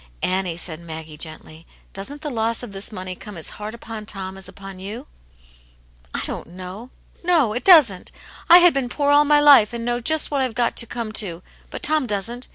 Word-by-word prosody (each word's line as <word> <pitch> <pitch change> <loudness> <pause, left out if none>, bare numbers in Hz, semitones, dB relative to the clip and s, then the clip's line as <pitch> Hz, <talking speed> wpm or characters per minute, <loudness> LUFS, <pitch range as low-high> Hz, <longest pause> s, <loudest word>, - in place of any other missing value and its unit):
"Annie," 185 -2 -1
said 165 -2 -5
Maggie, 160 -2 -8
gently, 155 +1 -8 0.3
"doesn't 270 +10 -5
the 295 - -4
loss 230 0 0
of 240 - -8
this 195 +2 -4
money 185 -2 -5
come 210 0 -10
as 160 - -6
hard 215 +2 -5
upon 225 -2 -8
Tom 190 -2 -4
as 190 -1 -9
upon 195 -1 -11
you 215 +8 -7 0.3
?" - - -29
" - - -34 0.3
I - - -1
don't - - -6
know. 185 +7 -9 0.3
No, 325 -11 +2
it 245 - -3
doesn't. 285 - +5 0.4
I 345 - +11
had 355 -1 +6
been 265 -3 -1
poor 285 +2 0
all 290 +1 +5
my 295 0 +4
life, 280 -7 +6
and 235 -1 -5
know 240 0 -1
just 315 +6 +2
what 280 -2 0
I've 255 -4 -2
got 240 -1 0
to 235 - +3
come 230 -2 -5
to; 175 -3 -7 0.3
but - - -8
Tom 305 -4 +2
doesn't. 230 +4 -4
215 Hz, 215 wpm, -21 LUFS, 185-255 Hz, 0.4 s, I